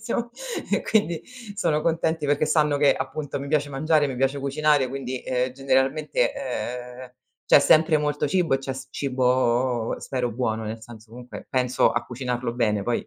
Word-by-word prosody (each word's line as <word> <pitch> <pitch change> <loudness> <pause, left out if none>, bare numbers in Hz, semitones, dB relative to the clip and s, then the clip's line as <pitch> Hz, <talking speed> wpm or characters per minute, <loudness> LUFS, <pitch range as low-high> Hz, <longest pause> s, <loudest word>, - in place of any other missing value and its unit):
siamo" 235 +1 -3 0.4
e - - +3
quindi 175 -7 +1 0.3
sono 155 -6 0
contenti 160 -1 0
perché 145 +1 +1
sanno 150 -2 +2
che, 145 -1 +4
appunto 145 -2 -4
mi 140 - -6
piace 145 -1 0
mangiare, 150 +2 +2
mi 130 -2 -5
piace 135 +2 0
cucinare, 140 -1 +1
quindi, 130 -1 -5
uhm, 125 0 0
generalmente, 135 0 +1
uhm, 125 +1 -5 0.3
c'è - - +7
sempre 155 0 +4
molto 150 0 -1
cibo 175 -4 +1
e - - +1
c'è 135 0 -4
s 130 0 -8
cibo 125 -3 +1
spero 125 -2 -2
buono, 110 -2 -2
nel 110 +1 -5
senso 110 -1 -13
comunque 125 +1 -10
penso 125 -1 +2
a 120 - -1
cucinarlo 125 -1 -3
bene, 105 -4 +1
poi 120 +2 -2
135 Hz, 170 wpm, -24 LUFS, 125-150 Hz, 0.4 s, c'è